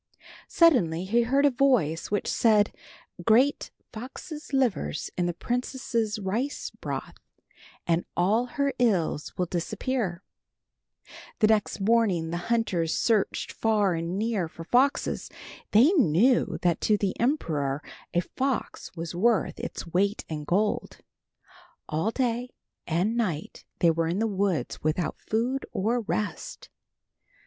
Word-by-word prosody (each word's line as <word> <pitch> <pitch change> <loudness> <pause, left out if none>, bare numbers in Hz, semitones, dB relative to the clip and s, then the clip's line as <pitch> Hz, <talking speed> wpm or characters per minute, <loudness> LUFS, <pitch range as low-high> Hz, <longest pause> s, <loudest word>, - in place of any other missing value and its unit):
Suddenly 185 - +3
he 230 +5 +3
heard 270 +5 +2
a 285 - +5
voice 245 - +2
which 205 - -1
said, 210 -3 +3 0.5
"Grate 250 +9 +3 0.2
foxes' 285 +7 -8
livers 240 - 0
in 175 -1 0
the - - 0
princess' 240 -2 -2
rice 215 +8 -3
broth - - -6 0.7
and 170 0 +1
all 210 +8 +2
her 280 +2 -1
ills 185 -10 0
will 180 - +1
disappear." 195 +2 -2 1.1
The 220 - +4
next 215 -1 +2
morning 195 -6 +2
the 170 - -1
hunters 185 -9 +1
searched 220 -4 +1
far 210 -4 +1
and 170 +2 -3
near 215 -5 0
for 165 +1 -10
foxes. 255 +10 +1 0.4
They 240 - +6
knew 245 - +3
that 175 -2 +2
to 210 - +3
the 200 -2 -1
emperor 155 - 0 0.3
a 175 - +2
fox 260 +8 -3
was 165 0 -5
worth 220 +5 +1
its - - -5
weight 195 +5 0
in 150 -2 -5
gold. 205 +6 0 0.9
All 160 +7 0
day 245 0 -1 0.4
and 180 +7 +1
night 180 -10 -3
they 170 - +4
were 165 0 0
in 170 +3 -1
the 225 - +1
woods 195 -5 -1
without 155 +2 -1
food 245 +5 -1
or 230 +4 0
rest. - - -4
210 Hz, 130 wpm, -27 LUFS, 175-245 Hz, 1.1 s, They